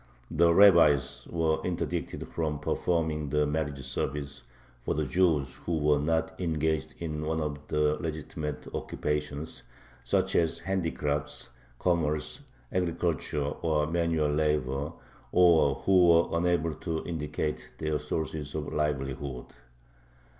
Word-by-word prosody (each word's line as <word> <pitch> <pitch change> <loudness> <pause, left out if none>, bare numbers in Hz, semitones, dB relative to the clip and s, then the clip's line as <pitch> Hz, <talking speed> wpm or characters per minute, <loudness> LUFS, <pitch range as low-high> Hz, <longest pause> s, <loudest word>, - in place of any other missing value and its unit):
The 85 +1 +4
rabbis 85 -9 +5
were 80 -2 +1
interdicted 90 -2 -3
from 80 -3 -2
performing 80 -1 -1
the 75 +1 +2
marriage 75 -3 -2
service 70 +1 -3 0.4
for - - -2
the 75 0 0
Jews 75 -3 +2
who 85 -2 -2
were 75 -1 +3
not 80 +2 0
engaged 80 -2 -1
in 75 -2 -4
one 80 +1 -1
of 75 -2 -2
the 75 0 +2
legitimate 80 -2 -4
occupations, 75 -1 -3 0.4
such - - +1
as 85 -1 +2
handicrafts, 80 -5 -2 0.3
commerce, 75 -3 0 0.3
agriculture, 85 -4 -1
or 75 +1 0
manual 80 -2 +1
labor, 75 -2 0 0.4
or 80 -6 +5
who 90 +3 +4
were 85 0 +4
unable 85 -1 +1
to 80 +1 -4
indicate 75 -4 -3
their 75 -1 -1
sources 75 0 -4
of 75 -1 -4
livelihood. 70 -3 -2
75 Hz, 120 wpm, -29 LUFS, 75-85 Hz, 0.4 s, rabbis